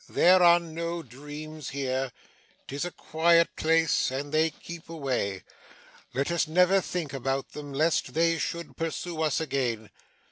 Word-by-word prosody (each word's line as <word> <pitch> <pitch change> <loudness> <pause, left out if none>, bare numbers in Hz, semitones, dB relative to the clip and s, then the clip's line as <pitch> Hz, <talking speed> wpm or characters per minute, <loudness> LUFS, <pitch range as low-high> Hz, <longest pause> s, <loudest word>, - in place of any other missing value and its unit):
There 185 +1 +5
are 175 0 +7
no 170 0 -4
dreams 150 +4 -8
here. 135 -1 -2 0.6
'Tis 140 +5 -3
a - - -2
quiet 170 0 +2
place, 160 0 +2
and 140 +2 -4
they 160 +1 +3
keep 165 +1 -10
away. 130 - -2 0.7
Let 140 +5 0
us 170 -2 +1
never 180 +4 +4
think 170 -6 -4
about 135 0 -2
them, 145 -1 -8
lest 155 +4 +1
they 165 0 +3
should 170 +2 -4
pursue 165 0 -3
us 155 -4 +1
again. 130 -8 -2
155 Hz, 145 wpm, -28 LUFS, 135-170 Hz, 0.7 s, are